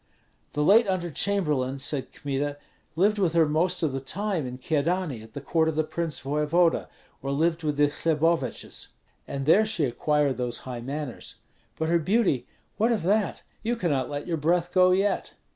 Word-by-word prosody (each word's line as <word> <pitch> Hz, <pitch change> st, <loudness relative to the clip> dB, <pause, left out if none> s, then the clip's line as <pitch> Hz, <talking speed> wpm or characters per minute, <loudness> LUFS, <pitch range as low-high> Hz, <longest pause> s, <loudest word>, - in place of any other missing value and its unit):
"The 150 Hz, -, 0 dB
late 210 Hz, +7 st, +6 dB
under 180 Hz, -3 st, -1 dB
chamberlain," 150 Hz, -9 st, 0 dB
said 135 Hz, 0 st, -2 dB
Kmita, 145 Hz, 0 st, -3 dB, 0.4 s
"lived 205 Hz, +5 st, +3 dB
with 180 Hz, -5 st, +2 dB
her 165 Hz, -2 st, +4 dB
most 175 Hz, +4 st, 0 dB
of 155 Hz, -, +2 dB
the 135 Hz, -, -1 dB
time 180 Hz, +1 st, -2 dB
in 125 Hz, 0 st, -6 dB
Kyedani, 155 Hz, -1 st, -1 dB
at 110 Hz, 0 st, -14 dB
the 140 Hz, -, -4 dB
court 160 Hz, +3 st, +1 dB
of 160 Hz, -, -3 dB
the 155 Hz, -, +2 dB
prince 165 Hz, 0 st, -3 dB
voevoda, 150 Hz, +4 st, +1 dB, 0.3 s
or 135 Hz, -, -4 dB
lived 165 Hz, +4 st, +1 dB
with 150 Hz, -2 st, -1 dB
the 145 Hz, -, +5 dB
Hleboviches; 160 Hz, -3 st, -1 dB, 0.4 s
and 135 Hz, -1 st, -4 dB
there 190 Hz, +8 st, +6 dB
she 215 Hz, -8 st, 0 dB
acquired 145 Hz, +2 st, +1 dB
those 125 Hz, -1 st, -2 dB
high 125 Hz, -2 st, -5 dB
manners. 140 Hz, 0 st, -6 dB, 0.4 s
But 160 Hz, 0 st, -1 dB
her 170 Hz, 0 st, +3 dB
beauty, 175 Hz, -, +1 dB, 0.3 s
what 225 Hz, +3 st, +3 dB
of 220 Hz, -6 st, 0 dB
that? 205 Hz, +3 st, +1 dB, 0.2 s
You 235 Hz, +2 st, 0 dB
cannot 150 Hz, -, 0 dB
let 145 Hz, 0 st, -4 dB
your 170 Hz, -2 st, -1 dB
breath 170 Hz, +3 st, +1 dB
go 185 Hz, -1 st, +6 dB
yet." 195 Hz, +2 st, +1 dB
160 Hz, 180 wpm, -26 LUFS, 140-180 Hz, 0.4 s, late